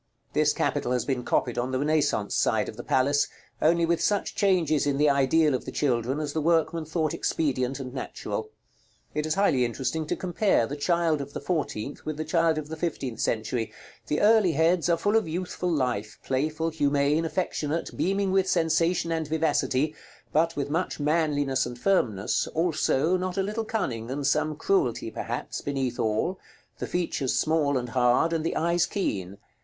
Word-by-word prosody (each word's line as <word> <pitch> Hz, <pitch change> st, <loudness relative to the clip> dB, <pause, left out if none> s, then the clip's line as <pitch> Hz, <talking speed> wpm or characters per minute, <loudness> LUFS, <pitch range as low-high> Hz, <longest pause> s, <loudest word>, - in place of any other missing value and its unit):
This -, -, +3 dB
capital 125 Hz, -, 0 dB
has 125 Hz, -, 0 dB
been 130 Hz, -3 st, -1 dB
copied 120 Hz, 0 st, 0 dB
on 125 Hz, +2 st, -2 dB
the 130 Hz, -, 0 dB
Renaissance 150 Hz, +2 st, +1 dB
side -, -, +2 dB
of -, -, -7 dB
the -, -, -6 dB
palace, 145 Hz, +2 st, +2 dB, 0.3 s
only 170 Hz, +2 st, +4 dB
with 170 Hz, 0 st, +1 dB
such 205 Hz, -1 st, 0 dB
changes 165 Hz, -7 st, +2 dB
in 140 Hz, -1 st, +1 dB
the 150 Hz, 0 st, +4 dB
ideal 140 Hz, +2 st, +3 dB
of 130 Hz, -, -1 dB
the -, -, -5 dB
children 130 Hz, 0 st, 0 dB
as 150 Hz, -2 st, -3 dB
the 160 Hz, -, -1 dB
workman 165 Hz, 0 st, +1 dB
thought 155 Hz, 0 st, -1 dB
expedient 135 Hz, -3 st, -1 dB
and 130 Hz, -2 st, -6 dB
natural. 285 Hz, -, -5 dB, 0.6 s
It 150 Hz, 0 st, -1 dB
is 155 Hz, -, 0 dB
highly 190 Hz, -10 st, +3 dB
interesting 135 Hz, +6 st, -2 dB
to -, -, 0 dB
compare 185 Hz, -, +1 dB
the 140 Hz, -, -5 dB
child 165 Hz, 0 st, +1 dB
of 140 Hz, +1 st, -8 dB
the -, -, -4 dB
fourteenth 145 Hz, -7 st, -3 dB
with 155 Hz, -1 st, -4 dB
the 155 Hz, -, -3 dB
child 165 Hz, 0 st, +2 dB
of 155 Hz, -1 st, -4 dB
the 160 Hz, -, -5 dB
fifteenth 155 Hz, -7 st, -3 dB
century. 110 Hz, +1 st, -1 dB, 0.4 s
The 150 Hz, -, 0 dB
early 210 Hz, -5 st, +5 dB
heads 165 Hz, +3 st, +2 dB
are 170 Hz, -, +3 dB
full 205 Hz, +5 st, +1 dB
of 225 Hz, -5 st, +2 dB
youthful 180 Hz, +2 st, -3 dB
life, 125 Hz, -9 st, -1 dB
playful, 155 Hz, +5 st, -1 dB
humane, 145 Hz, 0 st, +2 dB
affectionate, 165 Hz, -1 st, -2 dB
beaming 195 Hz, +1 st, 0 dB
with 190 Hz, 0 st, +2 dB
sensation 165 Hz, 0 st, +1 dB
and 160 Hz, -2 st, -1 dB
vivacity, 150 Hz, -2 st, +1 dB, 0.4 s
but 165 Hz, +2 st, +2 dB
with 145 Hz, 0 st, -3 dB
much 165 Hz, +2 st, -1 dB
manliness 145 Hz, -4 st, +1 dB
and 120 Hz, 0 st, -7 dB
firmness, 120 Hz, -, +1 dB
also, 165 Hz, 0 st, +2 dB
not 185 Hz, 0 st, -3 dB
a 195 Hz, -, +2 dB
little 215 Hz, +3 st, -3 dB
cunning, 120 Hz, -, -3 dB
and 140 Hz, +2 st, -3 dB
some 155 Hz, +2 st, +1 dB
cruelty 390 Hz, -, 0 dB
perhaps, -, -, -4 dB
beneath 135 Hz, -4 st, -2 dB
all; 110 Hz, -, 0 dB, 0.4 s
the -, -, -3 dB
features 165 Hz, -7 st, -1 dB
small 155 Hz, -3 st, +2 dB
and 125 Hz, -1 st, -3 dB
hard, 125 Hz, +7 st, +3 dB
and 160 Hz, -1 st, 0 dB
the 165 Hz, -, -1 dB
eyes 170 Hz, +2 st, +2 dB
keen. 100 Hz, -, -3 dB
155 Hz, 180 wpm, -26 LUFS, 135-170 Hz, 0.6 s, early